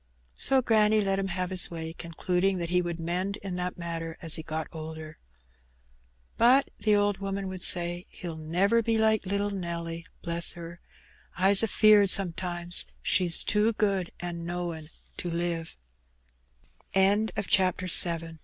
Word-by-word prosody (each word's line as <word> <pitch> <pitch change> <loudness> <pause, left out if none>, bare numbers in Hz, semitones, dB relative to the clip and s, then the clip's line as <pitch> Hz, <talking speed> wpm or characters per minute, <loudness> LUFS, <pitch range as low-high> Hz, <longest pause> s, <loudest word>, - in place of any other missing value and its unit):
So 265 - +3
granny 215 -2 +3
let 195 -1 0
him 195 - -2
have 185 0 -4
his 185 -2 +4
way, 160 -1 -6
concluding 180 +3 -2
that 170 -1 -4
he 180 0 +2
would 170 -1 -5
mend 180 +4 -3
in 190 -2 -5
that 180 0 -4
matter 165 -1 -6
as 165 -3 -5
he 160 - 0
got 160 0 -5
older. 160 -1 -9 1.2
"But," 255 +4 +4
the 215 -1 +2
old 205 -1 +1
woman 195 0 -4
would 185 -1 -8
say, 175 0 +2
"he'll 170 -3 -7
never 180 +9 +1
be 225 0 0
like 220 -2 +1
little 200 +1 -1
Nelly. 170 -3 -5 0.2
Bless 170 0 +4
her! 170 0 -10 0.6
I's 195 +2 +4
afeard, 215 -2 +4
sometimes, 175 -2 +1 0.2
she's 175 -3 +4
too 215 +2 +2
good 195 -4 -1
an' 170 -1 -6
knowin' 170 -3 -5
180 Hz, 135 wpm, -27 LUFS, 170-200 Hz, 1.2 s, his